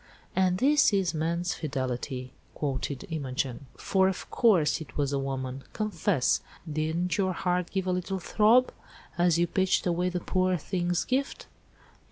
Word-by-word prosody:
"And 185 -1 +3
this 280 +1 +4
is 190 -4 +1
man's 170 +3 -1
fidelity!" 130 -2 -4 0.2
quoted 140 -2 -3
Imogen. 135 -3 -3
"For 190 -1 +2
of 190 - -3
course, 170 -10 +3
it 155 - -10
was 140 -1 0
a 140 - +1
woman. 135 -1 -4
Confess! 195 - +1 0.3
Didn't 160 +5 -1
your 190 -1 +1
heart 180 0 -1
give 190 -2 -2
a 185 - 0
little 180 +1 -2
throb, 220 +7 +4 0.4
as 175 -1 +3
you 170 - +3
pitched 190 +2 +1
away 180 0 +1
the 180 0 -2
poor 185 +1 +1
thing's 175 +2 -1
gift?" 270 +2 -1
175 Hz, 150 wpm, -28 LUFS, 145-190 Hz, 0.4 s, this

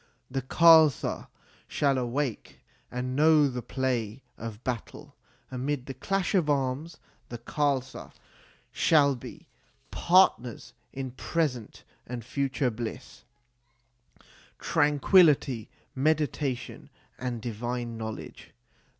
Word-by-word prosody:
The 135 +1 -1
Khalsa 160 +1 +4 0.4
shall 140 -2 +1
then 130 -1 -1
awake, 130 -1 -3 0.3
and 125 +1 -4
know 155 0 +5
the 125 -2 -4
play 125 -2 -2
of 115 +1 -8
battle.. 125 -4 -6 0.4
Amid 130 +1 -3
the 135 - -6
clash 190 +8 -2
of 175 -6 +2
arms 140 +3 -1 0.3
the 120 - -6
Khalsa 130 +1 -2
PREFACE - - -21
xix - - -27 0.5
shall 140 -3 +3
be 120 - -11 0.4
partners 170 - +2 0.2
in 130 -1 -5
present 130 -3 -3 0.2
and 120 -2 -6
future 135 -1 -1
bliss, 120 +3 -7 1.3
tran 150 -1 +1
quillity, 140 - +4 0.3
meditation, 145 -2 -1 0.3
and 125 -2 -3
divine 120 +1 -4
knowledge. 110 -1 -8
130 Hz, 105 wpm, -28 LUFS, 120-150 Hz, 1.3 s, know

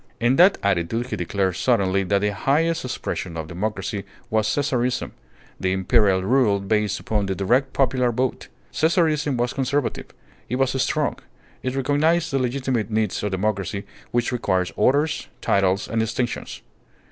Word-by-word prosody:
In 120 +3 +3
that 185 +3 +6
attitude, 100 +4 0
he - - 0
declared 95 +1 -1
suddenly 100 -6 +2
that 100 +1 +1
the 105 0 0
highest 160 +9 +1
expression 95 -8 -4
of 80 - -4
democracy 100 +2 -3 0.3
was 110 -1 +2
Caesarism: 125 -3 0 0.5
the 95 0 0
imperial 95 -1 +3
rule 115 -2 +3
based 105 +1 0
upon 105 -2 -1
the 95 - -1
direct 125 +9 +1
popular 130 -2 +2
vote. 125 +2 -2 0.3
Caesarism 155 -4 +2
was 120 +2 0
conservative. 135 0 -1 0.4
It 125 - -1
was 135 0 +2
strong. - - 0 0.4
It 130 0 -3
recognized 155 +5 +1
the 135 - +1
legitimate 125 -3 -1
needs 110 -2 0
of 105 - -1
democracy 100 0 -2 0.2
which 120 +1 0
requires 95 -7 0
orders, 145 +8 +1
titles, 95 0 +1
and 115 - -1
distinctions. 115 +2 -3
115 Hz, 145 wpm, -23 LUFS, 100-135 Hz, 0.5 s, that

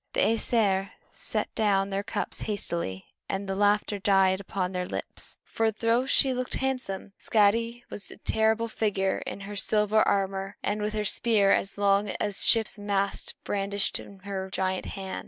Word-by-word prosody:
The - - +2
Æsir 210 -4 +2 0.2
set - - 0
down 200 -2 +2
their 195 +1 0
cups 215 - -2
hastily, 170 - -3 0.2
and 195 +1 -2
the 195 - -1
laughter 205 +1 +2
died 190 -1 +4
upon 190 -1 -2
their 180 -1 -2
lips; - - -5
for 225 0 +1
though 230 +4 +1
she 270 -1 +3
looked 250 0 -2
handsome, 255 -8 -3
Skadi 230 +3 +2
was 205 - -5
a - - -11
terrible 220 +2 +1
figure 200 -4 0
in - - -5
her 205 +1 -7
silver 210 +1 +3
armor 195 0 0
and 210 +1 -1
with 210 +1 -1
her 210 -1 -1
spear 205 -2 +3
as 195 - +1
long 200 0 +3
as 205 -2 -1
a - - +3
ship's 220 -2 +3
mast 200 -1 -1
brandished 200 0 -1
in 200 - -11
her 190 -1 -4
giant 190 0 -1
hand. 190 -1 -5
200 Hz, 170 wpm, -27 LUFS, 195-220 Hz, 0.2 s, died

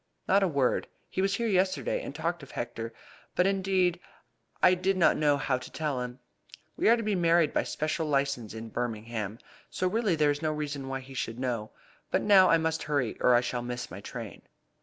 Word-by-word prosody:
"Not 195 +2 +4
a 195 - +3
word. 140 -6 +1 0.2
He 190 - -1
was 195 0 +1
here 235 - -1
yesterday, 210 - +1
and - - -7
talked 170 0 -2
of 140 - -12
Hector, 115 -1 -5 0.4
but 180 - +3
indeed 190 -2 +1 0.6
I 180 - +6
did 185 +1 +1
not 170 - +5
know 145 -2 +3
how 135 -2 0
to - - -10
tell 150 -5 -2
him. 125 0 -5 0.6
We - - +3
are 235 - +6
to 230 - -3
be 215 -1 0
married 170 -3 +3
by - - +3
special 155 +1 -2
licence 140 -6 -1
in 110 0 -7
Birmingham, 110 -2 -3 0.3
so 185 - -1
really 210 -2 +1
there 150 -2 +3
is 145 +1 -3
no 155 -1 0
reason 145 -3 -4
why 135 0 -3
he 135 +1 -12
should 115 -3 -3
know. 120 -4 -2 0.4
But - - +1
now 195 -3 +7
I 165 - +6
must 160 0 -1
hurry 140 -6 -1
or 125 - +5
I 120 - +5
shall 125 0 -2
miss 120 0 -5
my 100 - -8
train." 115 0 -8
150 Hz, 210 wpm, -29 LUFS, 125-185 Hz, 0.6 s, now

